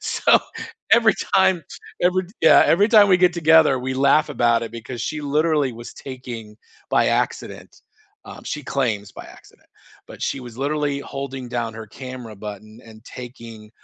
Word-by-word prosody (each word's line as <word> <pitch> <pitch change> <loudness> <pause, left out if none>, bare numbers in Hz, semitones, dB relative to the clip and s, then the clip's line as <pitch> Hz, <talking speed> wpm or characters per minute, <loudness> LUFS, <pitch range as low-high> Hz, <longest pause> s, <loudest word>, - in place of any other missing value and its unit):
So, - - +3 0.5
every 225 -3 +5 0.2
time 190 -3 +3 0.4
every 180 +1 +2
d 180 - -18
yeah, - - +7
every 200 +5 +4
time 215 -3 +6
we 185 - +6
get 180 -1 +4
together, 160 -4 +4
we 130 +1 -4
laugh 145 +3 +3
about 120 -3 +2
it, 115 - -9
because 115 +1 -7
she 150 +4 -3
literally 150 -1 +1
was 120 +1 -10
taking 120 -5 -9 0.3
by - - +3
accident. - - -3 0.5
Um, - - -11
she 150 - -5
claims 110 -8 -2
"by - - -10
accident," - - -23 0.4
but - - -12
she 135 - -2
was 120 -1 -11
literally 145 0 -1
holding 135 -2 -7
down 115 -2 -3
her 110 -1 -8
camera 125 -1 -9
button, 105 +2 -10
and 110 0 -15
taking 115 -3 -11
130 Hz, 165 wpm, -21 LUFS, 115-155 Hz, 0.5 s, yeah